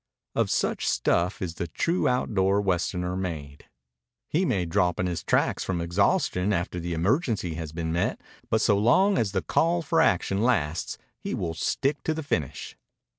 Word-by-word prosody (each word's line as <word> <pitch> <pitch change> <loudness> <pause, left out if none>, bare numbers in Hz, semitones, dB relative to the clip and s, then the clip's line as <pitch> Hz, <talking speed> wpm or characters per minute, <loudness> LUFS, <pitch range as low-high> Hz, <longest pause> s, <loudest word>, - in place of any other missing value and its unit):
Of - - +1
such - - 0
stuff 90 +2 +1
is 85 -2 -3
the 85 - -4
true 170 - 0
outdoor 100 -6 +2
Westerner 90 -1 -1
made. 75 -6 -5 0.6
He 175 +5 +1
may 100 - 0
drop 90 +1 +1
in 90 - +1
his 85 -2 -3
tracks - - +1
from 95 -2 -2
exhaustion 90 +2 +1
after 90 -2 -1
the 85 0 -3
emergency 100 - 0
has 80 -1 -5
been 80 0 -3
met, 85 - 0 0.3
but 110 - +2
so 100 -1 +3
long 185 - +4
as 105 -4 0
the 95 -1 -1
call 170 +1 +1
for 140 - +2
action 95 +2 +2
lasts 90 -10 0 0.2
he - - -3
will 85 -2 -2
stick 140 - -1
to 160 - -1
the 160 - -4
finish. 80 - -3
95 Hz, 175 wpm, -26 LUFS, 85-115 Hz, 0.6 s, long